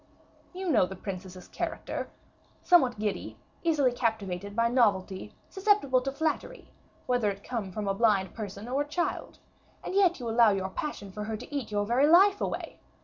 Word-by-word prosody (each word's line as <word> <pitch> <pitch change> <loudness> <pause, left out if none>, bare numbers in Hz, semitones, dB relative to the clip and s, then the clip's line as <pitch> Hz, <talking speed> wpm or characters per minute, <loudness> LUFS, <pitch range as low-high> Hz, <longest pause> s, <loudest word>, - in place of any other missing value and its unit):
"You 375 +1 -5
know 225 - +4
the 190 - -7
princess's 185 -1 -7
character, - - -4 0.5
somewhat 265 -10 +4
giddy, 210 -1 -3 0.2
easily 300 -6 +2
captivated 205 -5 -2
by 230 +1 +3
novelty, 205 -6 +1
susceptible 385 -11 +2
to 270 +1 -2
flattery, 320 - -3 0.3
whether 245 -4 +1
it 200 0 -6
come 225 -6 -4
from 205 +2 -4
a 195 - +1
blind 195 -3 +2
person 205 0 -7
or 265 +3 0
a 290 - -3
child, 345 +4 -3 0.5
and - - -5
yet 375 -4 +3
you 240 - -5
allow 230 0 +5
your 190 -2 -1
passion 205 -4 -5
for 210 +2 -5
her 220 0 -3
to 250 +6 -9
eat 270 -6 -3
your 205 -1 0
very 250 +6 +3
life 390 +5 +6
away. - - -4
230 Hz, 175 wpm, -28 LUFS, 200-290 Hz, 0.5 s, life